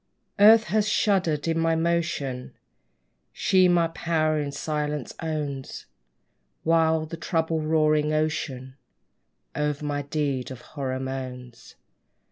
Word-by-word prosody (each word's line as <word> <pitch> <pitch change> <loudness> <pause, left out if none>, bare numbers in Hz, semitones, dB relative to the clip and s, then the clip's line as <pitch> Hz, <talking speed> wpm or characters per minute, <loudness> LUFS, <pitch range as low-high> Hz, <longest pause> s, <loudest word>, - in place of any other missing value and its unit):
Earth 220 +2 +8
has 215 +1 0
shuddered 185 -9 +1
at 165 - +1
my 165 0 +2
motion: 160 -6 -2 0.8
She 185 -1 +3
my 175 -2 +3
power 155 -2 0
in 145 -1 -3
silence 150 -2 -3
owns; 150 -4 -4 0.8
While 160 -1 +3
the 165 +1 -7
troubled, 160 -1 -1
roaring 155 -1 +2
ocean 140 -4 -2 0.8
O'er 150 0 0
my 145 -1 -2
deeds 140 -3 -2
of 130 -2 -9
horror 130 -3 -4
moans. 130 -2 -7
155 Hz, 110 wpm, -25 LUFS, 140-165 Hz, 0.8 s, Earth